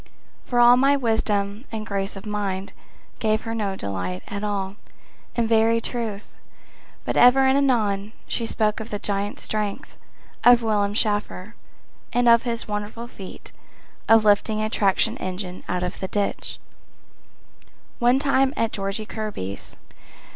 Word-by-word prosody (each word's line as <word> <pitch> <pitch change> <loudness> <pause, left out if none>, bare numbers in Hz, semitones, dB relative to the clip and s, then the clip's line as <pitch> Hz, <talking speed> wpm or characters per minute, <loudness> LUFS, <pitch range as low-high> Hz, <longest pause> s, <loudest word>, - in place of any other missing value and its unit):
For 245 - +1
all 240 +1 +8
my 275 +2 +4
wisdom 215 -2 0
and 220 -1 -4
grace 195 -1 -3
of 195 +2 -9
mind 200 -2 -3 0.5
Gave 215 -1 +1
her 225 0 -4
no 205 -4 -2
delight 90 - -4
at 200 0 -5
all, 200 -2 -2 0.6
in 235 - +1
very 225 0 +3
truth, 225 -3 -4 0.7
But - - -2
ever 250 +2 +7
and 265 0 +4
anon 215 -7 +1
she 230 - -2
spoke 215 -2 0
of 220 +1 -7
the 205 - -3
giant 200 0 -3
strength 210 -2 -4 0.5
Of 240 -1 +7
Willard 205 -2 +1
Shafer, 205 -2 -1 0.6
and 245 0 +2
of 235 0 +7
his 235 -2 -3
wonderful 210 +3 -4
feat 195 -6 -11 0.6
Of 225 -1 +6
lifting 210 +1 +3
a 215 0 -1
traction 220 +3 +2
engine 185 0 -5
out 180 0 -1
of 180 - -4
the 190 - -3
ditch 200 +1 -2 1.4
One 245 +2 +4
time 270 -1 +2
at 230 -1 +1
Georgie 195 +2 -3
Kirby's. 210 - -5
215 Hz, 145 wpm, -23 LUFS, 200-230 Hz, 1.4 s, all